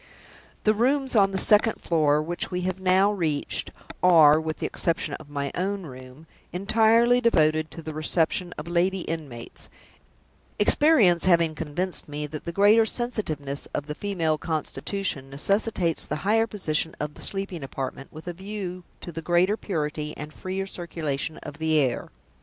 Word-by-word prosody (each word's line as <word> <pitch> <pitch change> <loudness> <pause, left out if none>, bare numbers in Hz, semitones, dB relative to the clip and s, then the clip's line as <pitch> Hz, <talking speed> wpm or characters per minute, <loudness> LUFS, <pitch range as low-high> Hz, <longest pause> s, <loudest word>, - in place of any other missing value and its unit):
The 215 - +4
rooms 265 +4 +1
on 200 -2 +5
the 195 - -3
second 210 +3 +4
floor, 150 -3 +2
which 175 +2 -3
we 180 -1 -2
have 185 +1 -2
now 190 +2 +4
reached, 160 -8 -1 0.3
are 160 -4 +6
(with 160 0 -4
the - - -4
exception 165 -3 -1
of 150 - -14
my 140 -1 -3
own 195 +2 -2
room) 130 +1 -11 0.3
entirely 225 +6 +3
devoted 155 -8 +2
to 165 - -10
the 155 - -6
reception 160 +3 +1
of 150 - -7
lady 180 +2 +1
inmates 145 -9 -7 0.9
experience 210 - +4
having 170 -3 +4
convinced 160 +3 -3
me 150 +1 -4
that 150 0 -8
the 170 - -3
greater 205 +5 +5
sensitiveness 180 - -3
of 145 - -2
the 150 - -5
female 165 -4 -1
constitution 160 -1 -2
necessitates 180 +3 0
the - - -2
higher 225 +2 +3
position 160 -6 -1
of 150 0 -3
the - - -13
sleeping 195 -4 -1
apartment, 135 0 -6
with 155 +3 -11
a 175 - -3
view 190 -1 -6 0.2
to 175 - -7
the 165 0 -6
greater 175 +5 +2
purity 150 -7 -3
and 150 +1 -7
freer 190 +1 -4
circulation 165 -5 -4
of 145 - -9
the 160 0 +2
air. 130 -5 0
170 Hz, 160 wpm, -25 LUFS, 150-195 Hz, 0.9 s, are